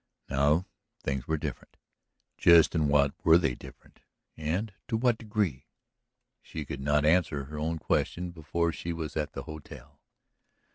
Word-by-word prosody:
Now 75 Hz, +6 st, +3 dB, 0.4 s
things 65 Hz, -2 st, -2 dB
were 80 Hz, -, +1 dB
different. -, -, -6 dB, 0.6 s
Just 85 Hz, -2 st, +6 dB
in 80 Hz, -3 st, +2 dB
what 70 Hz, -1 st, +3 dB
were 80 Hz, 0 st, +7 dB
they 85 Hz, -7 st, +1 dB
"different" -, -, -14 dB, 0.4 s
and 90 Hz, +8 st, -2 dB
to 110 Hz, -, 0 dB
what 120 Hz, -1 st, +2 dB
degree? 105 Hz, -, -2 dB, 0.7 s
She 80 Hz, -2 st, -7 dB
could 70 Hz, -3 st, -6 dB
not 75 Hz, +1 st, +2 dB
answer 80 Hz, -3 st, +2 dB
her 75 Hz, +2 st, -7 dB
own 80 Hz, +2 st, -1 dB
question 90 Hz, +2 st, -1 dB
before 85 Hz, +1 st, -1 dB
she 85 Hz, +1 st, -4 dB
was 80 Hz, -3 st, -5 dB
at 75 Hz, -2 st, -2 dB
the 70 Hz, -, -5 dB
hotel. 75 Hz, -3 st, -11 dB
80 Hz, 150 wpm, -29 LUFS, 75-85 Hz, 0.7 s, were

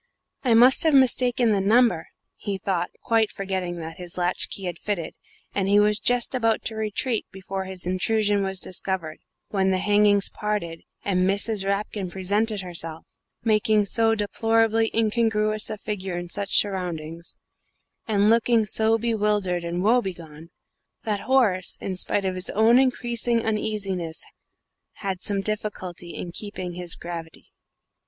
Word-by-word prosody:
"I 240 Hz, -4 st, +4 dB
must 250 Hz, +3 st, +6 dB
have 315 Hz, -3 st, +3 dB
mistaken 250 Hz, -3 st, +4 dB
the 200 Hz, -2 st, +2 dB
number," 215 Hz, -4 st, +3 dB, 0.3 s
he 200 Hz, -1 st, -4 dB
thought, 180 Hz, -2 st, -1 dB
quite 225 Hz, -2 st, +2 dB
forgetting 190 Hz, -3 st, -3 dB
that 165 Hz, 0 st, -7 dB
his 180 Hz, -1 st, -8 dB
latch 180 Hz, 0 st, +1 dB
key 195 Hz, -, -5 dB
had 175 Hz, -2 st, -4 dB
fitted, 190 Hz, -6 st, -3 dB, 0.4 s
and 195 Hz, -1 st, 0 dB
he 205 Hz, +1 st, +5 dB
was 210 Hz, 0 st, +3 dB
just 245 Hz, +1 st, +1 dB
about 225 Hz, -3 st, +1 dB
to 225 Hz, -, -3 dB
retreat 220 Hz, +2 st, -2 dB
before 190 Hz, 0 st, -5 dB
his 190 Hz, -2 st, -3 dB
intrusion 205 Hz, +3 st, +1 dB
was 190 Hz, -1 st, -3 dB
discovered, 180 Hz, -4 st, -4 dB, 0.3 s
when 190 Hz, -2 st, +1 dB
the 190 Hz, -, +2 dB
hangings 205 Hz, 0 st, +3 dB
parted, 205 Hz, -6 st, -3 dB, 0.2 s
and 185 Hz, -1 st, +2 dB
Mrs. 200 Hz, 0 st, 0 dB
Rapkin 200 Hz, -1 st, -2 dB
presented 200 Hz, +3 st, 0 dB
herself, 165 Hz, -3 st, -3 dB, 0.4 s
making 215 Hz, -1 st, +3 dB
so 225 Hz, +2 st, +3 dB
deplorably 225 Hz, +1 st, +1 dB
incongruous 215 Hz, -1 st, +1 dB
a 215 Hz, -, -4 dB
figure 195 Hz, -4 st, -4 dB
in 175 Hz, 0 st, -6 dB
such 200 Hz, +1 st, 0 dB
surroundings, 170 Hz, -4 st, -2 dB, 0.7 s
and 205 Hz, -2 st, +2 dB
looking 230 Hz, 0 st, +3 dB
so 220 Hz, +1 st, +2 dB
bewildered 210 Hz, -6 st, 0 dB
and 170 Hz, +1 st, -2 dB
woebegone, 175 Hz, -9 st, -1 dB, 0.5 s
that 210 Hz, -2 st, -1 dB
Horace, 215 Hz, -9 st, +2 dB
in 190 Hz, -, -4 dB
spite 195 Hz, +2 st, 0 dB
of 190 Hz, -, 0 dB
his 185 Hz, +1 st, -2 dB
own 225 Hz, +4 st, +5 dB
increasing 240 Hz, -2 st, +1 dB
uneasiness, 200 Hz, -6 st, -2 dB, 0.7 s
had 190 Hz, -2 st, -4 dB
some 200 Hz, -2 st, +1 dB
difficulty 190 Hz, -4 st, -4 dB
in 175 Hz, -, -6 dB
keeping 185 Hz, -2 st, -6 dB
his 175 Hz, -1 st, -3 dB
gravity. 170 Hz, -2 st, -8 dB
205 Hz, 145 wpm, -24 LUFS, 185-220 Hz, 0.7 s, must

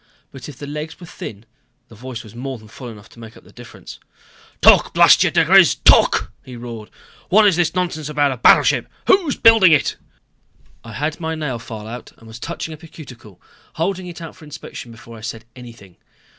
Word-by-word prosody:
But 135 Hz, 0 st, -10 dB
if 140 Hz, -, -12 dB
the 145 Hz, -, -8 dB
legs 150 Hz, +3 st, -7 dB
were 175 Hz, -, -11 dB
thin, 110 Hz, -8 st, -10 dB, 0.4 s
the 115 Hz, -, -17 dB
voice 120 Hz, +2 st, -8 dB
was 110 Hz, -2 st, -14 dB
more 130 Hz, +2 st, -6 dB
than 110 Hz, -1 st, -16 dB
full 125 Hz, +4 st, -11 dB
enough 105 Hz, -3 st, -13 dB
to -, -, -18 dB
make 115 Hz, -1 st, -12 dB
up -, -, -18 dB
for -, -, -22 dB
the -, -, -21 dB
difference. -, -, -13 dB, 0.6 s
"Talk, -, -, +5 dB
blast -, -, +6 dB
you -, -, +2 dB
diGriz -, -, +4 dB
talk!" -, -, +4 dB
he 125 Hz, -, -11 dB
roared. 115 Hz, -3 st, -9 dB, 0.4 s
"What 215 Hz, +3 st, +5 dB
is 200 Hz, -5 st, +4 dB
this 175 Hz, 0 st, 0 dB
nonsense 170 Hz, -5 st, -3 dB
about 145 Hz, -2 st, +1 dB
a 130 Hz, -, -5 dB
battleship? 120 Hz, -, +4 dB, 0.2 s
Who's 365 Hz, -8 st, +2 dB
building 225 Hz, -7 st, +6 dB
it?" 150 Hz, -, +1 dB, 0.9 s
I 115 Hz, -1 st, -11 dB
had 150 Hz, +7 st, -3 dB
my 160 Hz, -1 st, -3 dB
nail 150 Hz, -6 st, -4 dB
file 110 Hz, -2 st, -9 dB
out 120 Hz, +2 st, -9 dB
and 115 Hz, -, -19 dB
was 110 Hz, +1 st, -11 dB
touching 165 Hz, +2 st, -6 dB
up 155 Hz, -, -13 dB
a 165 Hz, -, -12 dB
cuticle, 120 Hz, -, -14 dB, 0.3 s
holding 185 Hz, +2 st, -3 dB
it 170 Hz, -1 st, -9 dB
out 165 Hz, -, -10 dB
for 185 Hz, -, -17 dB
inspection 150 Hz, -5 st, -10 dB
before 115 Hz, 0 st, -13 dB
I -, -, -15 dB
said 110 Hz, 0 st, -7 dB
anything. 115 Hz, -7 st, -14 dB
135 Hz, 210 wpm, -19 LUFS, 115-160 Hz, 0.9 s, blast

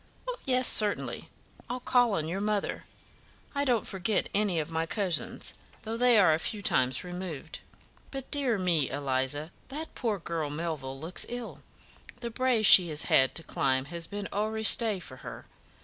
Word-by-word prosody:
"Oh, -, -, -4 dB
yes, 255 Hz, -1 st, +2 dB
certainly, 210 Hz, -1 st, +3 dB, 0.4 s
I'll 250 Hz, +1 st, -3 dB
call 245 Hz, -2 st, +2 dB
on 160 Hz, -5 st, -2 dB
your 185 Hz, +4 st, -4 dB
mother. 210 Hz, -1 st, -2 dB, 0.7 s
I 280 Hz, 0 st, -1 dB
don't 245 Hz, -5 st, +1 dB
forget 195 Hz, +2 st, -1 dB
any 200 Hz, -5 st, 0 dB
of 155 Hz, +1 st, -4 dB
my 165 Hz, 0 st, -2 dB
cousins, 190 Hz, -3 st, -1 dB, 0.3 s
though 225 Hz, +1 st, -4 dB
they 245 Hz, 0 st, +4 dB
are 185 Hz, -6 st, +5 dB
a 155 Hz, -, 0 dB
few 205 Hz, +4 st, -3 dB
times 130 Hz, -5 st, +1 dB
removed. 175 Hz, -3 st, -7 dB, 0.5 s
But, 270 Hz, -1 st, -8 dB
dear 270 Hz, -6 st, +1 dB
me, 170 Hz, -7 st, 0 dB
Eliza, 140 Hz, +2 st, -2 dB, 0.2 s
that 305 Hz, +4 st, -7 dB
poor 225 Hz, -5 st, -2 dB
girl 165 Hz, -4 st, -4 dB
Melville 145 Hz, -4 st, -5 dB
looks 165 Hz, +5 st, -1 dB
ill; 245 Hz, -1 st, -7 dB, 0.6 s
the 235 Hz, -1 st, -6 dB
brae 250 Hz, -1 st, 0 dB
she 185 Hz, -4 st, +9 dB
has 150 Hz, -1 st, -1 dB
had 130 Hz, 0 st, +4 dB
to 165 Hz, -, -2 dB
climb 130 Hz, -3 st, 0 dB
has 170 Hz, -1 st, -3 dB
been 205 Hz, 0 st, -6 dB
owre 220 Hz, +2 st, -2 dB
stey 220 Hz, -2 st, +6 dB
for 130 Hz, -7 st, -9 dB
her. -, -, -10 dB
190 Hz, 170 wpm, -28 LUFS, 160-230 Hz, 0.7 s, she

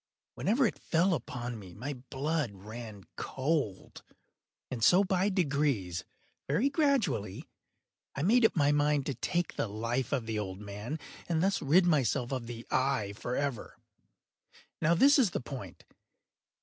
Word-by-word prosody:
Whenever 240 Hz, +6 st, +2 dB
it 215 Hz, -, -1 dB
fell 175 Hz, +3 st, +2 dB
upon 120 Hz, -4 st, -4 dB
me, 95 Hz, -4 st, -11 dB
my 135 Hz, +7 st, -4 dB
blood 135 Hz, +3 st, -2 dB
ran 110 Hz, +1 st, -9 dB
cold; 135 Hz, -, -2 dB, 0.7 s
and 120 Hz, -4 st, -3 dB
so 185 Hz, -, +6 dB
by 190 Hz, +1 st, +1 dB
degrees—very 145 Hz, -, -1 dB
gradually—I 170 Hz, -, -2 dB
made 230 Hz, +7 st, +4 dB
up 220 Hz, -, +4 dB
my 145 Hz, -3 st, +4 dB
mind 145 Hz, -1 st, +2 dB
to 140 Hz, -, -1 dB
take 175 Hz, +8 st, -1 dB
the -, -, 0 dB
life 115 Hz, +4 st, -2 dB
of 130 Hz, -5 st, 0 dB
the 110 Hz, -1 st, -2 dB
old 95 Hz, -2 st, -5 dB
man, 105 Hz, +8 st, -5 dB, 0.3 s
and 165 Hz, -1 st, +1 dB
thus 195 Hz, +1 st, +1 dB
rid 170 Hz, +6 st, +5 dB
myself 135 Hz, -6 st, +2 dB
of 130 Hz, -3 st, -3 dB
the 115 Hz, -1 st, -7 dB
eye 130 Hz, -6 st, +1 dB
forever. 125 Hz, +3 st, -3 dB, 1.0 s
Now 165 Hz, +2 st, +4 dB
this 280 Hz, -, +6 dB
is 235 Hz, -7 st, +4 dB
the -, -, -2 dB
point. 135 Hz, 0 st, -8 dB
140 Hz, 140 wpm, -31 LUFS, 115-170 Hz, 1.0 s, so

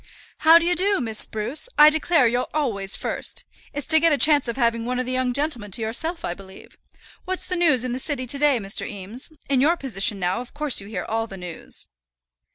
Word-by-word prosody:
"How 325 Hz, +1 st, +7 dB
d'ye 340 Hz, +1 st, +1 dB
do, 390 Hz, +3 st, +1 dB
Miss 225 Hz, -4 st, 0 dB
Spruce? 235 Hz, -, 0 dB
I 300 Hz, +1 st, +8 dB
declare 315 Hz, -2 st, +2 dB
you're 245 Hz, +2 st, 0 dB
always 200 Hz, -10 st, -1 dB
first. -, -, -3 dB, 0.3 s
It's 290 Hz, -2 st, -6 dB
to 320 Hz, -1 st, +4 dB
get 330 Hz, +1 st, +3 dB
a 290 Hz, -, +3 dB
chance 295 Hz, -2 st, +4 dB
of 235 Hz, -, -3 dB
having 230 Hz, -2 st, +1 dB
one 250 Hz, +2 st, -3 dB
of 255 Hz, -, -2 dB
the 255 Hz, -, -4 dB
young 255 Hz, -1 st, 0 dB
gentlemen 250 Hz, -6 st, -2 dB
to 230 Hz, -, +1 dB
yourself, 320 Hz, +10 st, -3 dB
I 175 Hz, -, -3 dB
believe. 190 Hz, +1 st, -15 dB, 0.5 s
What's 370 Hz, 0 st, -2 dB
the 365 Hz, -, -3 dB
news 310 Hz, -9 st, +3 dB
in 255 Hz, -, -3 dB
the 255 Hz, -, -3 dB
city 270 Hz, -2 st, -1 dB
to 255 Hz, +3 st, +1 dB
day, 290 Hz, -3 st, +3 dB
Mr. 195 Hz, -2 st, 0 dB
Eames? 205 Hz, -, -6 dB, 0.2 s
In 270 Hz, -2 st, +2 dB
your 330 Hz, +5 st, +3 dB
position 205 Hz, -, 0 dB
now 180 Hz, +5 st, -1 dB
of 250 Hz, -, -13 dB
course 295 Hz, -7 st, +3 dB
you 200 Hz, -, -11 dB
hear 215 Hz, -, -5 dB
all 225 Hz, +1 st, -2 dB
the 195 Hz, -, -10 dB
news." 180 Hz, -3 st, -7 dB
255 Hz, 225 wpm, -22 LUFS, 220-305 Hz, 0.5 s, I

